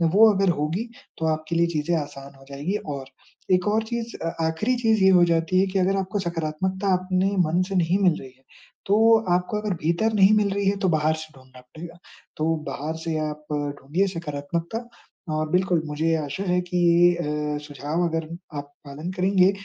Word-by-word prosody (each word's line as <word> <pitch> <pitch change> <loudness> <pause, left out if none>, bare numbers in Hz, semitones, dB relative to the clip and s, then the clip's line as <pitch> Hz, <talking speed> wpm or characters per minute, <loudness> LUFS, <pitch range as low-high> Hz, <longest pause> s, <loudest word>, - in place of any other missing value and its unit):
वो 220 +1 +8
अगर 195 -1 +2
होगी 170 +11 -2 0.3
तो 160 - -2
आपके 155 +2 -4
लिए 170 0 +3
चीज़ें 165 +1 -1
आसान 140 -2 -7
हो 135 0 -17
जाएँगी 145 +8 -3 0.2
और 135 -1 -6 0.5
एक 180 +2 +2
और 215 +2 +2
चीज़ 235 +1 -5
अ, 165 - -3
आखिरी 210 +11 0
चीज़ 225 -4 +2
ये 190 - +7
हो 180 -2 +6
जाती 165 +2 +1
है 195 - +2
कि, 190 +1 -1
अगर 190 +1 +2
आपको 195 +2 -2
सकारात्मकता 185 +3 -1
अपने 185 +1 0 0.2
मन 170 +3 +1
से 195 - -3
नहीं 175 +1 +2
मिल 175 -4 +3
रही 130 - -10
है 130 - -31 0.4
तो 205 - +4 0.4
आपको 180 +4 0
अगर 210 -2 -2
भीतर 170 +8 0
नहीं 200 0 +6
मिल 205 -1 +2
रही 200 0 -1
है 200 - 0
तो 190 - +1
बाहर 155 -1 +2
से 155 0 -9
ढूँढ़ना 130 -1 -16
पड़ेगा। 165 +7 -11 0.4
तो 155 - 0 0.2
बाहर 155 +3 -4
से 160 -1 -2
आप 150 0 -4 0.4
ढूँढिए 170 +9 0
सकारात्मकता 165 +3 -4 0.6
और 155 0 -1
बिल्कुल 180 -2 +2
मुझे 155 +2 0
आशा 150 +5 -4
है 180 0 +2
कि 180 - -1
ये 170 -4 +2
अ, - - -3
सुझाव 150 +4 -2
अगर 160 -1 -3 0.3
आप 145 0 -7 0.2
पालन 150 +6 -6
करेंगे 185 0 +4
170 Hz, 195 wpm, -24 LUFS, 155-190 Hz, 0.6 s, वो